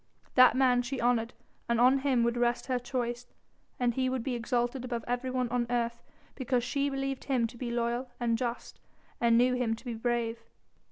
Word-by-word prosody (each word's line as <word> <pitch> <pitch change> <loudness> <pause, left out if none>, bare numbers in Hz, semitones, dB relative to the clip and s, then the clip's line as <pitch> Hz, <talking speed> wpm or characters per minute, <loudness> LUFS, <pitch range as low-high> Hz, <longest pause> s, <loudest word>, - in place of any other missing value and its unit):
That 255 -1 +7
man 255 -2 +4
she 250 +2 -4
honoured 235 -1 +1 0.3
and 235 -1 +2
on 255 +3 +5
him 265 -3 +2
would 235 0 +1
rest 240 0 0
her 255 -2 0
choice, 245 -1 -3 0.5
and 245 -1 +2
he 260 +1 0
would 255 -2 -2
be 260 - -2
exalted 240 +1 -1
above 240 -2 -4
everyone 250 +1 -1
on 240 0 0
earth 235 -1 -1 0.3
because 250 -2 -1
she 280 +3 0
believed 270 -1 -3
him 255 -4 +1
to 230 - -6
be 240 0 -4
loyal 240 +2 -1
and 235 -1 +1
just, 235 0 -4 0.4
and 230 -1 +4
knew 250 +1 +4
him 245 -3 0
to 230 - -16
be 240 - -3
brave. 230 0 -1
245 Hz, 190 wpm, -30 LUFS, 235-255 Hz, 0.5 s, That